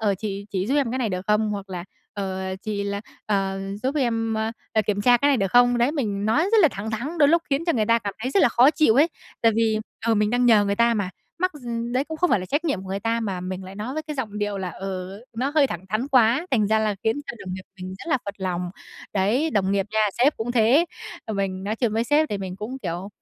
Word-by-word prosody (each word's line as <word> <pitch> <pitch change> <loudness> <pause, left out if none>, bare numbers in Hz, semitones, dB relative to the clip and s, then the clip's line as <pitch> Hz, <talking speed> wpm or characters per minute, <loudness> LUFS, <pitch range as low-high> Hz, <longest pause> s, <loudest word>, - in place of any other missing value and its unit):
ờ, 205 -3 +2
"Chị 200 -1 -4
chỉ 190 -1 -1
giúp 270 - 0
em 275 -5 +2
cái 260 - -2
này 240 - 0
được 185 -1 -4
không?" 210 0 +2
hoặc 200 -1 -5
là 175 -1 -5 0.3
"Ờ, 190 -1 -3
chị 205 -2 -2
là 200 0 -2 0.3
ờ, 195 -2 0 0.2
giúp 265 +3 0
em, 225 -4 0
ơ, 220 0 -1 0.2
ờ, 220 - +3
kiểm 205 -1 0
tra 245 +3 +6
cái 285 +4 +2
này 275 - +4
được 195 -4 0
không?" 245 0 +5
Đấy, 245 +5 +2
mình 210 -8 -2
nói 255 +9 +3
rất 450 - +6
là 320 - +7
thẳng 210 +3 -5
thắng, 275 +10 -4
đôi 290 -2 +6
lúc 335 +1 +4
khiến 280 +4 +1
cho 335 - +2
người 220 -6 +1
ta 230 +1 +4
cảm 200 -3 -5
thấy 255 - -1
rất 385 - +3
là - - +6
khó 250 +5 +5
chịu 305 -9 +3
ấy. 295 +6 +5 0.3
Tại 230 - +5
vì, 220 -1 +2 0.3
ừ, 230 - +4
mình 210 0 +2
đang 245 +1 +2
nhờ 215 -3 +6
người 200 0 0
ta 235 0 +4
mà, 200 -4 -1 0.3
mắc 370 +1 +1
gi 260 -4 -11 0.3
đấy 260 +2 +1
cũng 320 - -6
không 355 +2 +1
phải 195 - +3
là 185 - -6
trách 290 - -1
nhiệm 215 - -1
của 190 - -10
người 195 +1 -3
ta 230 +2 0
mà 195 -5 -3
mình 185 +1 -5
lại 190 +1 -9
nói 220 +6 -5
với 310 - -2
cái 305 -1 -6
giọng 215 -6 -4
điệu 205 -1 -2
là, 185 -2 -3
ừ, 190 +2 -6 0.2
nó 260 +4 0
hơi 295 -3 +5
thẳng 175 -5 -6
thắn 220 +7 -1
quá, 255 +5 +4
thành 220 -6 +3
ra 220 +1 +3
là 215 -1 +1
khiến 225 +6 +1
cho 235 - -6
đồng 185 -1 -4
nghiệp 185 - -7 0.2
mình 185 +1 -6
rất - - -9
là 270 - +3
phật 200 0 -5
lòng. 180 -2 -2 0.4
Đấy, 220 +11 +1
đồng 195 -6 +1
nghiệp 200 -1 +1
nha, 220 - +2 0.2
sếp 280 +5 +4
cũng 235 +2 -3
thế, 245 +8 +4 0.4
ờ, 220 - -4
mình 190 -1 -2
nói 215 +3 -2
chuyện 235 -3 0
với 225 +2 +1
sếp 300 +4 +3
thì 205 - -2
mình 185 -1 -5
cũng, 235 +6 -6
kiểu, 180 -3 -4
220 Hz, 285 wpm, -24 LUFS, 195-255 Hz, 0.4 s, là